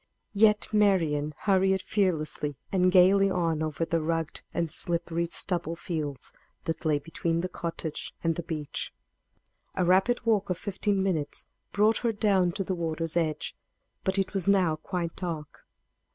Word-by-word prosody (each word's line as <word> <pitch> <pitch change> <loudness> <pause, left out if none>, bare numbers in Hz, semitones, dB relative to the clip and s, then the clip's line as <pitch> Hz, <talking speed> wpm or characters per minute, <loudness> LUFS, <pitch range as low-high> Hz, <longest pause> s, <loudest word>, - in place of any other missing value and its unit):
Yet 210 0 +4
Marian 165 -8 +3
hurried 190 -1 +3
fearlessly 155 -7 0
and 185 -1 +3
gayly 195 +2 +6
on 165 -4 0
over 155 +1 -1
the 165 0 0
rugged 165 0 -1
and 170 -2 -1
slippery 170 0 -2
stubble 170 -1 -1
fields 155 -6 -4 0.3
that 160 -1 -3
lay 155 -2 +3
between 165 +3 -2
the 180 - -1
cottage 165 -3 -4
and 165 -1 +2
the 175 - -4
beach. 155 -3 -4 0.8
A 185 - +1
rapid 190 +8 +3
walk 210 -4 +2
of 180 - 0
fifteen 200 0 -1
minutes 165 -7 -1 0.3
brought 215 +2 +3
her 235 -2 0
down 195 -4 +2
to 195 - -2
the 190 - -2
water's 165 -1 -2
edge. 155 -3 -1 0.5
But 190 +1 0
it 195 0 0
was 195 -3 -1
now 185 -5 +4
quite 170 +1 -4
dark. 165 -5 -6
175 Hz, 150 wpm, -28 LUFS, 160-195 Hz, 0.8 s, gayly